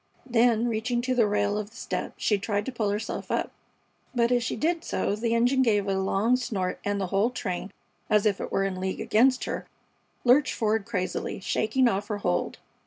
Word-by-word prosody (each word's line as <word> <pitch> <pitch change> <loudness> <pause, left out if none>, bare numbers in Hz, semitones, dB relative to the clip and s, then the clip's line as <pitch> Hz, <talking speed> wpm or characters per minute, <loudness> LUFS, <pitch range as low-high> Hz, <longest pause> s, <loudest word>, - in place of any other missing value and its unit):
Then, 235 -1 +3
reaching 240 +2 -1
to 255 0 0
the 235 -4 +3
rail 205 0 +1
of 210 -1 -5
the 225 - -21
step, - - -4
she 210 -2 +1
tried 205 0 -1
to - - -3
pull 225 -4 -1
herself 210 +2 -3
up, - - -1 0.6
but 235 0 +2
as 245 -1 +3
she 225 - -2
did 335 +1 0
so 200 - -1
the 230 +2 0
engine 245 +3 +3
gave 205 -5 +2
a 195 - +1
long 195 +5 +2
snort 195 -7 -2
and 205 0 -1
the 195 - 0
whole 200 +4 +3
train, 190 -5 -4 0.4
as 210 0 +3
if 205 -2 +1
it - - -5
were 195 - +1
in 190 -1 -2
league 190 0 -2
against 255 +4 +3
her, - - -4 0.6
lurched 255 +3 +4
forward 220 -1 0
crazily, 185 -5 -3
shaking 220 +6 +1
off 200 -1 -1
her 210 -1 -2
hold. 90 - -1
220 Hz, 205 wpm, -27 LUFS, 200-240 Hz, 0.6 s, lurched